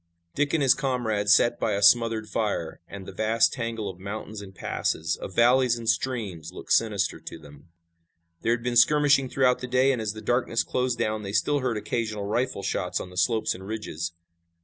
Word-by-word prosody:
Dick 145 Hz, 0 st, 0 dB
and 150 Hz, -, +1 dB
his 130 Hz, -, +6 dB
comrades 115 Hz, -7 st, 0 dB
sat 120 Hz, +3 st, +4 dB
by -, -, 0 dB
a 100 Hz, +1 st, -1 dB
smothered 115 Hz, 0 st, +4 dB
fire, 105 Hz, -6 st, -2 dB
and 100 Hz, 0 st, -9 dB
the -, -, -8 dB
vast 110 Hz, +1 st, +2 dB
tangle 115 Hz, -3 st, -4 dB
of 95 Hz, -2 st, -7 dB
mountains 105 Hz, +2 st, -6 dB
and 95 Hz, -1 st, -12 dB
passes, 80 Hz, -1 st, -2 dB
of 95 Hz, -, -9 dB
valleys 120 Hz, +1 st, +4 dB
and 115 Hz, -1 st, -8 dB
streams 100 Hz, -12 st, -2 dB
looked -, -, -10 dB
sinister 105 Hz, -4 st, +1 dB
to -, -, -9 dB
them. 75 Hz, 0 st, -16 dB, 0.7 s
There 115 Hz, -, +2 dB
had 115 Hz, 0 st, -3 dB
been 120 Hz, 0 st, -2 dB
skirmishing 145 Hz, +1 st, +4 dB
throughout 125 Hz, -2 st, +2 dB
the 125 Hz, -, -5 dB
day, 130 Hz, +2 st, +3 dB
and 125 Hz, -4 st, -2 dB
as 105 Hz, -1 st, -2 dB
the 110 Hz, -, -9 dB
darkness 120 Hz, -1 st, 0 dB
closed 125 Hz, -1 st, -1 dB
down 110 Hz, 0 st, -1 dB
they 100 Hz, -1 st, -6 dB
still 145 Hz, +7 st, +1 dB
heard 125 Hz, -4 st, -1 dB
occasional 110 Hz, -1 st, -3 dB
rifle 120 Hz, 0 st, -2 dB
shots 90 Hz, -1 st, -2 dB
on 90 Hz, -, -8 dB
the -, -, -13 dB
slopes 110 Hz, +5 st, +1 dB
and 95 Hz, +1 st, -10 dB
ridges. 85 Hz, -6 st, -5 dB
110 Hz, 200 wpm, -26 LUFS, 100-125 Hz, 0.7 s, his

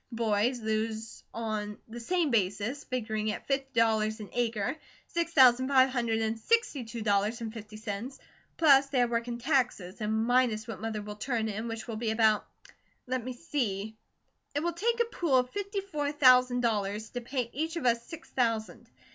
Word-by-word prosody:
The 240 Hz, -, -8 dB
boys 230 Hz, +2 st, +1 dB
lose 220 Hz, 0 st, -3 dB
on 215 Hz, -2 st, -3 dB
the 235 Hz, +1 st, -8 dB
same 330 Hz, +4 st, 0 dB
basis, 215 Hz, +6 st, 0 dB
figuring 220 Hz, -4 st, -2 dB
at -, -, -6 dB
fifty 270 Hz, -3 st, -1 dB
dollars 220 Hz, -1 st, +2 dB
and 210 Hz, -, -8 dB
acre, 235 Hz, 0 st, 0 dB, 0.3 s
six 340 Hz, -1 st, -2 dB
thousand 260 Hz, -3 st, +6 dB
five 265 Hz, -1 st, +5 dB
hundred 235 Hz, -3 st, 0 dB
and 220 Hz, 0 st, -1 dB
sixty 460 Hz, -, +1 dB
two 225 Hz, 0 st, -6 dB
dollars 205 Hz, +2 st, +1 dB
and 225 Hz, -2 st, -5 dB
fifty 215 Hz, -1 st, -9 dB
cents, 220 Hz, +4 st, -5 dB, 0.4 s
plus 280 Hz, -4 st, +6 dB
their 255 Hz, -3 st, +2 dB
work 235 Hz, 0 st, -1 dB
and 240 Hz, 0 st, -4 dB
taxes, 240 Hz, -, 0 dB
and 220 Hz, +1 st, 0 dB
minus 245 Hz, -3 st, +2 dB
what 220 Hz, -3 st, -7 dB
Mother 220 Hz, -2 st, -3 dB
will 210 Hz, 0 st, -7 dB
turn 225 Hz, -1 st, -1 dB
in, 220 Hz, +2 st, -4 dB
which 225 Hz, 0 st, -5 dB
will 225 Hz, -2 st, -4 dB
be 225 Hz, 0 st, -1 dB
about, 220 Hz, -1 st, +3 dB, 0.6 s
let 255 Hz, -1 st, -2 dB
me 255 Hz, +1 st, -4 dB
see 220 Hz, -8 st, -3 dB, 0.6 s
It 290 Hz, -, 0 dB
will 345 Hz, 0 st, 0 dB
take 460 Hz, +7 st, 0 dB
a -, -, +3 dB
pool 340 Hz, -, +1 dB
of 250 Hz, 0 st, +1 dB
fifty 405 Hz, 0 st, -3 dB
four 300 Hz, -7 st, -2 dB
thousand 255 Hz, -3 st, +5 dB
dollars 210 Hz, -2 st, -1 dB
to 245 Hz, -, -4 dB
pay 240 Hz, -1 st, -3 dB
each 320 Hz, +5 st, -2 dB
of 335 Hz, -, -3 dB
us 235 Hz, -1 st, +3 dB
six 330 Hz, +4 st, -10 dB
thousand. 230 Hz, -3 st, -1 dB
235 Hz, 190 wpm, -29 LUFS, 220-265 Hz, 0.6 s, thousand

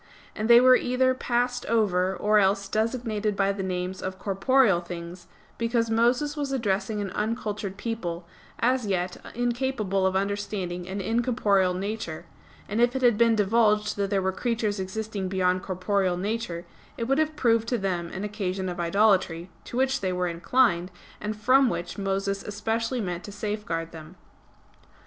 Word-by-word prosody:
And 215 Hz, +2 st, -2 dB
they 235 Hz, 0 st, +9 dB
were 255 Hz, +1 st, +7 dB
either 255 Hz, +1 st, +2 dB
passed 245 Hz, 0 st, -1 dB
over, 190 Hz, -5 st, +2 dB
or 210 Hz, +2 st, +3 dB
else 195 Hz, 0 st, +2 dB
designated 220 Hz, -1 st, -1 dB
by 195 Hz, 0 st, +2 dB
the 200 Hz, 0 st, -4 dB
names 185 Hz, 0 st, -3 dB
of 185 Hz, 0 st, -4 dB
corporeal 200 Hz, 0 st, +3 dB
things, 175 Hz, 0 st, -8 dB, 0.3 s
because 230 Hz, -1 st, 0 dB
Moses 245 Hz, +6 st, +2 dB
was 285 Hz, -2 st, -3 dB
addressing 215 Hz, -4 st, -1 dB
an 195 Hz, -2 st, -4 dB
uncultured 210 Hz, -2 st, -3 dB
people, 180 Hz, -7 st, -4 dB, 0.3 s
as 250 Hz, -1 st, +1 dB
yet 180 Hz, -2 st, -1 dB, 0.2 s
incapable 240 Hz, -6 st, 0 dB
of 190 Hz, -, -1 dB
understanding 190 Hz, -3 st, -2 dB
an 195 Hz, +1 st, -3 dB
incorporeal 210 Hz, -4 st, +1 dB
nature; 195 Hz, -4 st, -4 dB, 0.4 s
and 215 Hz, +3 st, -1 dB
if 240 Hz, +2 st, +3 dB
it 260 Hz, -, -1 dB
had 240 Hz, -3 st, +5 dB
been 230 Hz, +1 st, +4 dB
divulged 210 Hz, 0 st, +2 dB
that 200 Hz, -1 st, 0 dB
there 195 Hz, -2 st, +1 dB
were 190 Hz, -, +1 dB
creatures 220 Hz, -1 st, -1 dB
existing 200 Hz, +1 st, -4 dB
beyond 185 Hz, -1 st, +1 dB
corporeal 185 Hz, -1 st, 0 dB
nature, 190 Hz, -3 st, -3 dB, 0.3 s
it 230 Hz, -, -2 dB
would 270 Hz, +5 st, +1 dB
have 310 Hz, 0 st, 0 dB
proved 230 Hz, -4 st, +2 dB
to 245 Hz, -, +1 dB
them 180 Hz, -4 st, -2 dB
an 190 Hz, +3 st, -6 dB
occasion 195 Hz, -3 st, -3 dB
of 175 Hz, 0 st, -5 dB
idolatry, 185 Hz, -2 st, +2 dB
to 240 Hz, -, -6 dB
which 265 Hz, +1 st, +1 dB
they 190 Hz, -1 st, 0 dB
were 180 Hz, 0 st, -1 dB
inclined, 175 Hz, +1 st, +2 dB, 0.3 s
and 210 Hz, 0 st, -4 dB
from 255 Hz, +4 st, +5 dB
which 175 Hz, +1 st, -4 dB
Moses 195 Hz, 0 st, -1 dB
especially 225 Hz, +4 st, -2 dB
meant 180 Hz, -3 st, -4 dB
to 205 Hz, -, -8 dB
safeguard 205 Hz, -6 st, -3 dB
them. 160 Hz, +2 st, -11 dB
205 Hz, 165 wpm, -26 LUFS, 185-230 Hz, 0.4 s, they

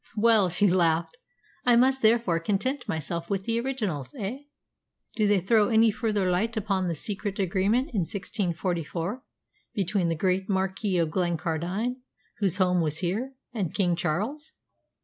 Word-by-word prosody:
"Well," 215 Hz, -3 st, +4 dB
she 175 Hz, +4 st, +1 dB
laughed, 170 Hz, -, +2 dB, 0.5 s
"I 245 Hz, -1 st, +5 dB
must 260 Hz, +2 st, +4 dB
therefore 220 Hz, -6 st, +3 dB
content 245 Hz, +9 st, -1 dB
myself 170 Hz, -1 st, -3 dB
with 195 Hz, -1 st, -2 dB
the 230 Hz, 0 st, +1 dB
originals, 210 Hz, -, -3 dB
eh? 215 Hz, +6 st, -4 dB, 0.8 s
Do 215 Hz, -2 st, +2 dB
they 205 Hz, -1 st, +4 dB
throw 210 Hz, +3 st, +3 dB
any 225 Hz, -1 st, +5 dB
further 210 Hz, -3 st, 0 dB
light 215 Hz, +6 st, 0 dB
upon 195 Hz, -3 st, 0 dB
the 170 Hz, -, -1 dB
secret 205 Hz, +4 st, -4 dB
agreement 200 Hz, -, +1 dB
in 210 Hz, -, +1 dB
1644 180 Hz, -, -2 dB, 0.5 s
between 195 Hz, -2 st, 0 dB
the 165 Hz, -, 0 dB
great 185 Hz, +3 st, 0 dB
Marquess 190 Hz, 0 st, 0 dB
of 160 Hz, -2 st, -1 dB
Glencardine, 175 Hz, -, -1 dB, 0.4 s
whose 195 Hz, -3 st, +2 dB
home 180 Hz, -2 st, +3 dB
was 155 Hz, -2 st, 0 dB
here, 205 Hz, +10 st, -2 dB, 0.2 s
and 195 Hz, -9 st, -3 dB
King 180 Hz, -4 st, +2 dB
Charles?" 210 Hz, -, -3 dB
195 Hz, 150 wpm, -27 LUFS, 175-220 Hz, 0.8 s, I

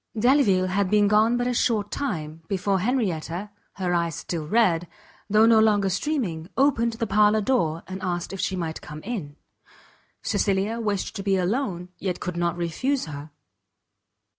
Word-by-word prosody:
Delvile 220 Hz, -6 st, +4 dB
had 185 Hz, +1 st, 0 dB
been 210 Hz, 0 st, +4 dB
gone 215 Hz, +3 st, +4 dB
but 245 Hz, -, 0 dB
a 250 Hz, -, 0 dB
short 220 Hz, -4 st, +1 dB
time, 160 Hz, -, -4 dB
before 195 Hz, 0 st, 0 dB
Henrietta, 195 Hz, -4 st, -1 dB, 0.2 s
her 185 Hz, -2 st, -2 dB
eyes 170 Hz, -2 st, 0 dB
still 160 Hz, -3 st, -4 dB
red, 175 Hz, -4 st, +2 dB, 0.4 s
though 215 Hz, +2 st, +5 dB
no 225 Hz, -1 st, +6 dB
longer 205 Hz, -3 st, +3 dB
streaming, 180 Hz, -, -2 dB
opened 245 Hz, -4 st, +3 dB
the 230 Hz, +1 st, -2 dB
parlour 210 Hz, +1 st, +4 dB
door, 175 Hz, -9 st, 0 dB
and 190 Hz, +1 st, -6 dB
asked 180 Hz, -1 st, -3 dB
if 195 Hz, -, -6 dB
she 190 Hz, -, -1 dB
might 165 Hz, -3 st, -4 dB
come 150 Hz, +1 st, -9 dB
in? 190 Hz, -11 st, -5 dB, 0.9 s
Cecilia 200 Hz, +3 st, 0 dB
wished 205 Hz, -4 st, -2 dB
to -, -, -3 dB
be 195 Hz, 0 st, +1 dB
alone, 185 Hz, -2 st, -1 dB
yet 185 Hz, -3 st, -2 dB
could 180 Hz, -1 st, -4 dB
not 175 Hz, 0 st, -1 dB
refuse 255 Hz, -, -1 dB
her. 145 Hz, -1 st, -8 dB
195 Hz, 165 wpm, -25 LUFS, 175-225 Hz, 0.9 s, no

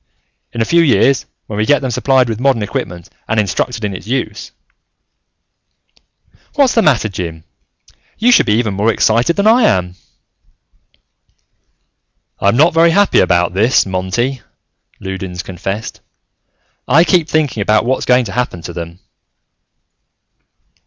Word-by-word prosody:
In 115 Hz, -, -1 dB
a -, -, -3 dB
few 170 Hz, +6 st, +3 dB
years, 140 Hz, -3 st, +2 dB, 0.2 s
when 105 Hz, -, -7 dB
we 105 Hz, -, 0 dB
can 145 Hz, -, +5 dB
get 140 Hz, -, -5 dB
them 130 Hz, -, -2 dB
supplied 130 Hz, +2 st, +2 dB
with 110 Hz, -1 st, -4 dB
modern 130 Hz, -4 st, +1 dB
equipment 90 Hz, -4 st, -5 dB, 0.2 s
and 110 Hz, -, 0 dB
instructed 110 Hz, +3 st, -2 dB
in 100 Hz, -, -3 dB
its 95 Hz, -, -9 dB
use 130 Hz, +3 st, -4 dB, 2.0 s
"What's 275 Hz, -3 st, +3 dB
the 225 Hz, -, +3 dB
matter, 130 Hz, -, +2 dB
Jim? 85 Hz, -5 st, -6 dB, 0.7 s
You 240 Hz, +3 st, +3 dB
should -, -, +4 dB
be 105 Hz, -, +2 dB
even 110 Hz, -3 st, -1 dB
more 105 Hz, +4 st, +1 dB
excited 115 Hz, +9 st, +1 dB
than 200 Hz, -, 0 dB
I 230 Hz, +3 st, +5 dB
am." 90 Hz, -, 0 dB, 2.5 s
"I'm 100 Hz, +4 st, +1 dB
not 160 Hz, +5 st, +4 dB
very 165 Hz, +1 st, +4 dB
happy 200 Hz, +4 st, +3 dB
about 90 Hz, -1 st, +1 dB
this, 110 Hz, +7 st, +2 dB
Monty," 95 Hz, +8 st, -2 dB, 0.6 s
Loudons 95 Hz, -2 st, -6 dB
confessed. 95 Hz, +4 st, -6 dB, 0.9 s
"I 165 Hz, -, +5 dB
keep 170 Hz, -2 st, +1 dB
thinking 145 Hz, -9 st, 0 dB
about 105 Hz, +3 st, +1 dB
what's 130 Hz, +2 st, -1 dB
going 125 Hz, 0 st, +3 dB
to 100 Hz, -, -7 dB
happen 105 Hz, -7 st, -3 dB
to 85 Hz, -, -7 dB
them." 85 Hz, 0 st, -7 dB
115 Hz, 145 wpm, -15 LUFS, 95-140 Hz, 2.5 s, can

